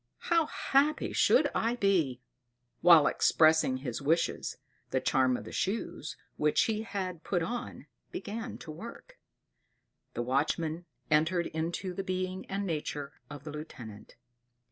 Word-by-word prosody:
How 335 Hz, -2 st, +4 dB
happy 290 Hz, +2 st, +1 dB
should -, -, +4 dB
I 230 Hz, +2 st, +1 dB
be!" 170 Hz, -, +1 dB, 0.6 s
While 165 Hz, -4 st, +8 dB
expressing 155 Hz, -5 st, +4 dB
his 130 Hz, -1 st, -4 dB
wish, 165 Hz, +4 st, +3 dB, 0.6 s
the -, -, +1 dB
charm 130 Hz, -1 st, +2 dB
of -, -, -8 dB
the -, -, -9 dB
shoes, 195 Hz, -6 st, -3 dB, 0.2 s
which 150 Hz, 0 st, +3 dB
he 215 Hz, -1 st, 0 dB
had 190 Hz, -6 st, -4 dB
put 175 Hz, -3 st, 0 dB
on, 240 Hz, +8 st, -5 dB, 0.3 s
began 230 Hz, -, -5 dB
to 155 Hz, -, -6 dB
work; 235 Hz, -, -10 dB, 1.0 s
the 120 Hz, -, -1 dB
watchman 155 Hz, +6 st, 0 dB, 0.3 s
entered 160 Hz, +3 st, +3 dB
into 170 Hz, +4 st, -3 dB
the 195 Hz, -, -3 dB
being 185 Hz, 0 st, -3 dB
and 200 Hz, +1 st, -2 dB
nature 150 Hz, -4 st, -3 dB, 0.2 s
of 145 Hz, -2 st, -9 dB
the 150 Hz, -, -6 dB
lieutenant. 120 Hz, -9 st, -9 dB
170 Hz, 135 wpm, -30 LUFS, 150-200 Hz, 1.0 s, While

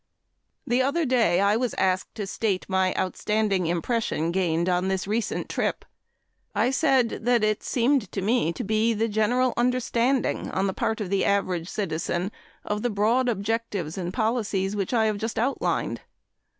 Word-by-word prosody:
The 245 Hz, +2 st, +2 dB
other 280 Hz, +5 st, +1 dB
day 230 Hz, -9 st, +3 dB
I 200 Hz, +1 st, +3 dB
was 245 Hz, +1 st, -1 dB
asked 185 Hz, 0 st, 0 dB
to 210 Hz, -, -3 dB
state 195 Hz, -1 st, -1 dB
my 190 Hz, -1 st, +2 dB
outstanding 195 Hz, -1 st, 0 dB
impression 170 Hz, -1 st, -1 dB
gained 170 Hz, -2 st, 0 dB
on 180 Hz, 0 st, +1 dB
this 190 Hz, -1 st, -1 dB
recent 215 Hz, +3 st, -2 dB
trip. -, -, -2 dB, 0.7 s
I 250 Hz, -, +2 dB
said 270 Hz, -4 st, +2 dB
that 240 Hz, -2 st, +3 dB
it 215 Hz, -1 st, +1 dB
seemed 250 Hz, -1 st, +1 dB
to -, -, -3 dB
me 220 Hz, -5 st, +2 dB
to -, -, -5 dB
be 220 Hz, +2 st, +1 dB
the 225 Hz, +2 st, +1 dB
general 235 Hz, +4 st, +1 dB
understanding 250 Hz, +1 st, +1 dB
on 190 Hz, -, 0 dB
the 190 Hz, -, 0 dB
part 220 Hz, +3 st, -1 dB
of 195 Hz, -3 st, -4 dB
the 195 Hz, -, +2 dB
average 185 Hz, -4 st, 0 dB
citizen 175 Hz, 0 st, -2 dB, 0.3 s
of 210 Hz, 0 st, -2 dB
the 245 Hz, -, 0 dB
broad 230 Hz, +5 st, +2 dB
objectives 205 Hz, -6 st, -2 dB
and 180 Hz, -2 st, -3 dB
policies 210 Hz, -3 st, -1 dB
which 195 Hz, -3 st, -2 dB
I 225 Hz, -3 st, +3 dB
have 215 Hz, -1 st, 0 dB
just 225 Hz, +1 st, -3 dB
outlined. 255 Hz, +5 st, -1 dB
215 Hz, 165 wpm, -25 LUFS, 190-235 Hz, 0.7 s, day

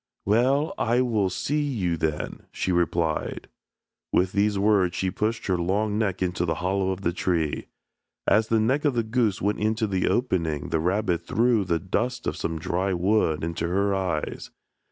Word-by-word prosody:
"Well, 135 Hz, -, +2 dB
I 120 Hz, +2 st, +2 dB
will 110 Hz, -6 st, +1 dB
see 145 Hz, +11 st, -1 dB
you 105 Hz, -, -1 dB
then," 80 Hz, -1 st, -3 dB
she 95 Hz, -, -2 dB
replied. 85 Hz, -2 st, 0 dB, 0.6 s
With 90 Hz, +1 st, +2 dB
these 100 Hz, 0 st, +1 dB
words 100 Hz, -3 st, +3 dB
she 95 Hz, -1 st, -1 dB
pushed 110 Hz, +4 st, -2 dB
her 90 Hz, -2 st, 0 dB
long 105 Hz, +4 st, 0 dB
neck 100 Hz, -4 st, 0 dB
into 90 Hz, -1 st, -1 dB
the 80 Hz, -2 st, 0 dB
hollow 95 Hz, +1 st, 0 dB
of 95 Hz, 0 st, -3 dB
the 85 Hz, -2 st, 0 dB
tree. 85 Hz, -4 st, -1 dB, 0.6 s
As 110 Hz, +1 st, +3 dB
the 115 Hz, 0 st, +2 dB
neck 130 Hz, +7 st, +1 dB
of 145 Hz, -4 st, +2 dB
the 115 Hz, -, +1 dB
goose 110 Hz, -4 st, 0 dB
went 105 Hz, +1 st, 0 dB
into 110 Hz, +1 st, +1 dB
the 95 Hz, -3 st, 0 dB
opening 85 Hz, -, 0 dB
the 80 Hz, -, +1 dB
rabbit 90 Hz, +1 st, 0 dB
threw 115 Hz, -2 st, +2 dB
the 85 Hz, -2 st, +1 dB
dust 120 Hz, +8 st, -2 dB
of -, -, -1 dB
some 80 Hz, -, -3 dB
dry 90 Hz, +4 st, -1 dB
wood 90 Hz, -4 st, +1 dB
into 85 Hz, +1 st, -2 dB
her 100 Hz, +3 st, +1 dB
eyes. 95 Hz, -5 st, -2 dB
95 Hz, 175 wpm, -25 LUFS, 90-110 Hz, 0.6 s, words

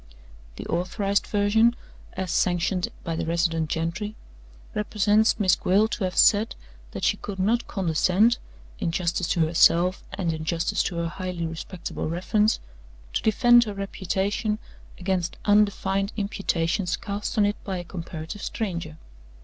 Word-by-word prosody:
"The -, -, -7 dB
authorized 195 Hz, +3 st, 0 dB
version 220 Hz, +3 st, +3 dB, 0.4 s
(as 185 Hz, -2 st, -3 dB
sanctioned 180 Hz, +1 st, +1 dB, 0.2 s
by 165 Hz, -3 st, -3 dB
the -, -, -2 dB
resident 165 Hz, -2 st, 0 dB
gentry) 170 Hz, +7 st, -2 dB, 0.6 s
represents 210 Hz, +1 st, +2 dB
Miss 190 Hz, -3 st, +4 dB
Gwilt 205 Hz, +5 st, +2 dB
to 205 Hz, -, -1 dB
have 185 Hz, -, -4 dB
said 215 Hz, +2 st, +5 dB, 0.3 s
that -, -, -7 dB
she -, -, +2 dB
could 200 Hz, -2 st, -6 dB
not 220 Hz, +6 st, +1 dB
condescend 190 Hz, +6 st, +2 dB, 0.4 s
in 185 Hz, -5 st, -1 dB
justice 170 Hz, +1 st, -1 dB
to 170 Hz, -, +1 dB
herself, 170 Hz, +3 st, +4 dB
and 175 Hz, -4 st, -1 dB
in 160 Hz, 0 st, -5 dB
justice 165 Hz, +1 st, 0 dB
to 175 Hz, -, -2 dB
her 170 Hz, 0 st, -1 dB
highly 180 Hz, -1 st, -4 dB
respectable 165 Hz, 0 st, -5 dB
reference 210 Hz, +6 st, +1 dB, 0.5 s
to -, -, 0 dB
defend 240 Hz, +2 st, +5 dB
her 210 Hz, -2 st, -5 dB
reputation 195 Hz, +2 st, -1 dB, 0.4 s
against 185 Hz, -1 st, -1 dB
undefined 200 Hz, -1 st, +2 dB
imputations 180 Hz, -3 st, -1 dB
cast 205 Hz, +2 st, -4 dB
on 210 Hz, -, +5 dB
it 205 Hz, +1 st, -2 dB
by 190 Hz, -2 st, -3 dB
a 175 Hz, -, -5 dB
comparative 170 Hz, +2 st, -7 dB
stranger. 170 Hz, -8 st, -4 dB
190 Hz, 140 wpm, -25 LUFS, 170-205 Hz, 0.6 s, said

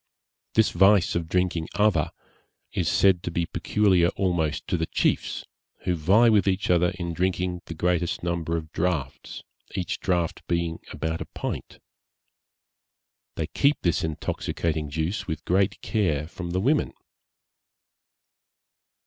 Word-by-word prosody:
This 110 Hz, -1 st, +4 dB
vice 95 Hz, +1 st, +5 dB
of 85 Hz, -1 st, -2 dB
drinking 90 Hz, -2 st, 0 dB
ava 105 Hz, -7 st, +3 dB, 0.6 s
is 85 Hz, -2 st, 0 dB
said 90 Hz, +1 st, +4 dB
to -, -, -3 dB
be 85 Hz, 0 st, -1 dB
peculiar 95 Hz, -2 st, +2 dB
almost 85 Hz, -5 st, 0 dB
to -, -, -1 dB
the 80 Hz, -1 st, -1 dB
chiefs, -, -, 0 dB, 0.4 s
who 90 Hz, -, 0 dB
vie 95 Hz, +9 st, +4 dB
with 105 Hz, -3 st, +4 dB
each 95 Hz, 0 st, +1 dB
other 90 Hz, 0 st, +4 dB
in 85 Hz, -2 st, -3 dB
drinking 90 Hz, 0 st, -1 dB
the 80 Hz, -, -7 dB
greatest 85 Hz, +1 st, 0 dB
number 85 Hz, -1 st, -1 dB
of 80 Hz, -1 st, -6 dB
draughts, 80 Hz, -6 st, -3 dB, 0.3 s
each 90 Hz, -, -2 dB
draught 90 Hz, -4 st, 0 dB
being 85 Hz, -1 st, -1 dB
about 80 Hz, +1 st, -3 dB
a -, -, -3 dB
pint. -, -, -6 dB, 1.6 s
They -, -, -1 dB
keep 140 Hz, +2 st, +2 dB
this 85 Hz, -, +1 dB
intoxicating 80 Hz, 0 st, -2 dB
juice 80 Hz, +7 st, -2 dB
with 80 Hz, -3 st, -4 dB
great 95 Hz, +3 st, +2 dB
care 80 Hz, -9 st, 0 dB
from 85 Hz, +1 st, -7 dB
the 90 Hz, +2 st, 0 dB
women. 145 Hz, +7 st, +2 dB
85 Hz, 135 wpm, -26 LUFS, 80-95 Hz, 1.6 s, vice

